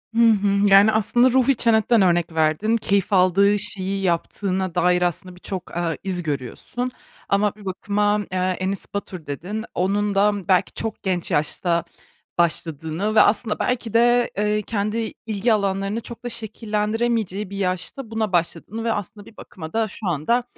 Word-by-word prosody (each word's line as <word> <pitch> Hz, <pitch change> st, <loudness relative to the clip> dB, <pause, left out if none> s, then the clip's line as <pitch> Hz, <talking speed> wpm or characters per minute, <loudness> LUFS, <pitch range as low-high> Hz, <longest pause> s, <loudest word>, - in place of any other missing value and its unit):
Hı -, -, +2 dB
hı. 200 Hz, -1 st, +2 dB
Yani, 200 Hz, +3 st, +7 dB
aslında 240 Hz, +4 st, +3 dB
Ruhi 260 Hz, +1 st, +3 dB
Çenet'ten 225 Hz, -1 st, +3 dB
örnek 175 Hz, -2 st, +2 dB
verdin, 160 Hz, +9 st, +2 dB
keyif 200 Hz, -2 st, 0 dB
aldığı 195 Hz, +3 st, +4 dB
şeyi 195 Hz, -1 st, +1 dB
yaptığına 185 Hz, +1 st, -1 dB
dair 180 Hz, 0 st, +3 dB
aslında 180 Hz, +1 st, -2 dB
birçok, 185 Hz, 0 st, -7 dB
eee, 170 Hz, -2 st, -1 dB
iz 180 Hz, -2 st, -3 dB
görüyorsun, 155 Hz, -, -4 dB, 0.4 s
ama 205 Hz, +1 st, +2 dB
bir 210 Hz, -2 st, -15 dB
bakıma, 205 Hz, +2 st, 0 dB
eee, 185 Hz, -, -2 dB
Enes 185 Hz, +1 st, -1 dB
Batur 185 Hz, -5 st, -5 dB
dedin, 190 Hz, +10 st, -5 dB
onun 200 Hz, +2 st, 0 dB
da, 205 Hz, +1 st, +4 dB
ımm, 205 Hz, -3 st, -4 dB
belki 185 Hz, -2 st, +2 dB
çok 225 Hz, -1 st, -4 dB
genç 185 Hz, -3 st, -1 dB
yaşta 170 Hz, +3 st, 0 dB, 0.5 s
başladığını 165 Hz, +4 st, -1 dB
ve -, -, +8 dB
aslında 210 Hz, +1 st, +2 dB
belki 240 Hz, -3 st, -2 dB
de, 240 Hz, +1 st, +4 dB
eee, 210 Hz, 0 st, +1 dB
kendi 215 Hz, +2 st, -2 dB
ilgi 220 Hz, +1 st, +1 dB
alanlarını 200 Hz, +2 st, -1 dB
çok 235 Hz, +1 st, -10 dB
da 245 Hz, -, -3 dB
şekillendiremeyeceği 220 Hz, -2 st, -2 dB
bir 200 Hz, -, -7 dB
yaşta 195 Hz, +6 st, -3 dB
buna 220 Hz, -3 st, -1 dB
başladığını 175 Hz, +6 st, -1 dB
ve 230 Hz, -, 0 dB
aslında 205 Hz, +1 st, -6 dB
bir 225 Hz, -, -16 dB
bakıma 160 Hz, -3 st, -10 dB
da 225 Hz, -1 st, +1 dB
şu 210 Hz, 0 st, -6 dB
anda 175 Hz, -, +1 dB
200 Hz, 160 wpm, -22 LUFS, 180-220 Hz, 0.5 s, ve